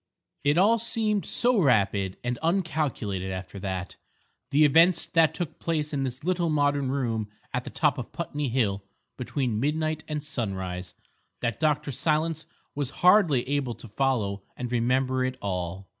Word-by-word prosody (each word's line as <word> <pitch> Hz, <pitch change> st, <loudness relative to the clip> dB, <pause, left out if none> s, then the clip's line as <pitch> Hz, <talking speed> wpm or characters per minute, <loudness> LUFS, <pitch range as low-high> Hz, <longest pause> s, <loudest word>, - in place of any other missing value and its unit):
It 145 Hz, +2 st, +3 dB
all 215 Hz, +5 st, +5 dB
seemed 215 Hz, -3 st, 0 dB
so 240 Hz, -4 st, +3 dB
rapid 100 Hz, -, +2 dB
and 120 Hz, -1 st, -2 dB
uncalculated 150 Hz, -, -1 dB
after 95 Hz, +1 st, -6 dB
that—the 100 Hz, +9 st, -2 dB
events 165 Hz, +4 st, +5 dB
that 165 Hz, -2 st, +3 dB
took 175 Hz, -5 st, -4 dB
place 155 Hz, -2 st, -2 dB
in 140 Hz, -, 0 dB
this 130 Hz, 0 st, -4 dB
little 175 Hz, -1 st, +1 dB
modern 145 Hz, -2 st, +1 dB
room 115 Hz, -6 st, -1 dB, 0.2 s
at 125 Hz, 0 st, -2 dB
the -, -, -5 dB
top 150 Hz, -5 st, +1 dB
of 120 Hz, -, -6 dB
Putney 150 Hz, -4 st, -3 dB
Hill 105 Hz, -6 st, 0 dB, 0.3 s
between 125 Hz, -3 st, -2 dB
midnight 155 Hz, +3 st, -1 dB
and 150 Hz, -1 st, -3 dB
sunrise—that 95 Hz, -, -5 dB
Dr. 150 Hz, -2 st, +1 dB
Silence 155 Hz, +3 st, 0 dB, 0.3 s
was 145 Hz, -3 st, -2 dB, 0.2 s
hardly 180 Hz, -, +5 dB
able 135 Hz, -4 st, -1 dB
to 115 Hz, -, -12 dB
follow 105 Hz, -4 st, 0 dB, 0.2 s
and 125 Hz, -1 st, -4 dB
remember 130 Hz, +2 st, +1 dB
it 130 Hz, 0 st, -2 dB
all. 95 Hz, -1 st, -4 dB
135 Hz, 145 wpm, -27 LUFS, 110-155 Hz, 0.3 s, all